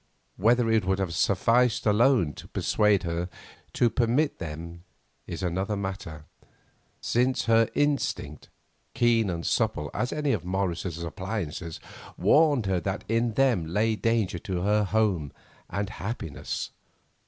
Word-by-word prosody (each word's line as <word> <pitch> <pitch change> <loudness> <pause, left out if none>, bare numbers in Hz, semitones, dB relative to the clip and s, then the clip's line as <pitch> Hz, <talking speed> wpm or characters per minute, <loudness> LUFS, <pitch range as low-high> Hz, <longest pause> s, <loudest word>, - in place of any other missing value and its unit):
Whether 120 +4 +3
it 110 -2 +3
would 95 +1 +1
have 95 -4 -2
sufficed 115 +7 +2
alone 110 - +3
to - - -11
persuade 105 -2 +2
her 85 +1 -2 0.4
to 120 - +3
permit 125 +7 +1
them 85 +1 -7 0.4
is - - -5
another 95 +4 -1
matter, 95 -6 -5 0.8
since 125 +2 +1
her 115 -1 +4
instinct, 140 - -1 0.5
keen 115 -3 +3
and 85 -2 -3
subtle 75 -1 0
as 125 +4 -1
any 150 -2 0
of 100 -7 -1
Morris's 90 -2 -2
appliances, 85 -2 -5 0.4
warned 145 -7 +4
her 95 -2 +1
that 95 +3 -3
in 115 +1 +1
them 120 -11 +2
lay 110 +6 +1
danger 110 -5 0
to 90 -1 -3
her 105 +2 +2
home 95 -9 +1 0.4
and 100 +3 -3
happiness. 100 - -5
100 Hz, 130 wpm, -27 LUFS, 85-115 Hz, 0.8 s, her